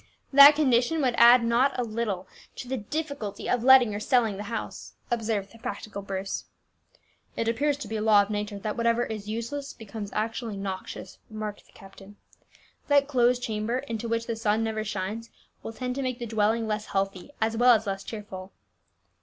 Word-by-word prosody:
"That 280 +2 +10
condition 265 +1 +2
would 250 -2 +2
add 235 +1 +8
not 245 +4 +2
a 250 - 0
little 215 -5 -3 0.3
to - - -8
the 265 - -2
difficulty 280 -2 -5
of 245 -2 0
letting 255 -4 +7
or 205 - -3
selling 225 -3 +1
the 205 - -6
house," 230 -2 -6 0.2
observed 220 -4 -1
the 230 - -16
practical 205 -1 -6
Bruce. 195 0 -4 0.9
"It 230 - -1
appears 280 +5 +1
to 285 - -7
be 220 +1 -3
a - - -3
law 210 -2 +5
of 200 - -7
nature 205 0 -3
that 210 +1 -4
whatever 235 0 +1
is 215 -2 -6
useless 235 +6 -4
becomes 215 -2 -8
actually 225 0 -3
noxious," 190 -1 -6
remarked 215 -1 -6
the - - -23
captain. 195 +1 -14 0.7
"That 285 -1 +4
closed 250 -3 +2
chamber, 220 +2 -2
into 230 -4 -5
which 230 0 -1
the 230 - -3
sun 220 0 0
never 220 -1 -2
shines, 215 +2 -4 0.3
will - - -6
tend 250 +2 -4
to 275 - -3
make 255 -2 -2
the 240 - -5
dwelling 220 +1 +1
less 215 0 -2
healthy, 195 +2 -2
as 225 0 0
well 245 +1 +6
as 220 0 -2
less 195 -1 -3
cheerful." 195 -4 -8
225 Hz, 185 wpm, -27 LUFS, 210-245 Hz, 0.9 s, That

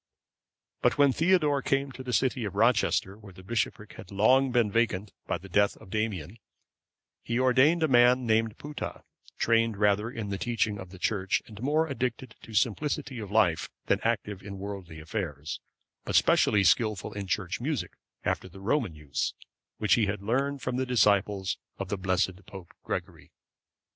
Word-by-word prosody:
But - - +2
when 140 -2 +5
Theodore 155 -4 +3
came 135 0 0
to 130 - -9
the 130 -1 -5
city 130 0 +1
of 100 -2 -4
Rochester, 110 -3 +2
where 100 -3 -13
the 95 +1 -14
bishopric 105 0 -2
had 110 -5 -10
been 95 - -10
long 130 +5 +4
vacant 110 -4 +1
by - - 0
the 95 - -12
death 100 +2 +2
of 105 -4 -15
Damian,(540) 105 -3 -2 0.8
he 115 - -2
ordained 130 +6 +4
a - - +4
man 125 -1 +5
named 110 -1 +1
Putta,(541) 150 0 -6 0.3
trained 115 -2 +2
rather 105 +2 +2
in 110 -4 -5
the 100 -1 -3
teaching 110 -3 -1
of 95 -2 -8
the 95 - -12
Church 95 0 0
and 105 -1 -12
more 150 +5 +2
addicted 130 -4 -3
to 110 - -10
simplicity 130 +2 0
of 105 -3 -6
life 100 -6 +2 0.2
than - - +2
active 105 -4 -1
in 100 0 -8
worldly 95 -5 -7
affairs, 80 -3 -4 0.4
but - - -3
specially 105 -2 +4
skilful 110 -1 +2
in 100 -1 -5
Church 95 -2 -2
music, 145 -1 -2 0.3
after 95 - -1
the 95 +2 -13
Roman 105 - 0
use, 75 -2 -3 0.4
which 105 - +2
he 110 -4 +3
had 100 0 -3
learned 135 +5 -1
from 125 -1 -2
the 130 - 0
disciples 100 -5 +2 0.2
of 100 -1 -5
the 100 - -1
blessed 95 0 0
Pope 95 -4 -11
Gregory. - - -5
110 Hz, 175 wpm, -28 LUFS, 100-125 Hz, 0.8 s, when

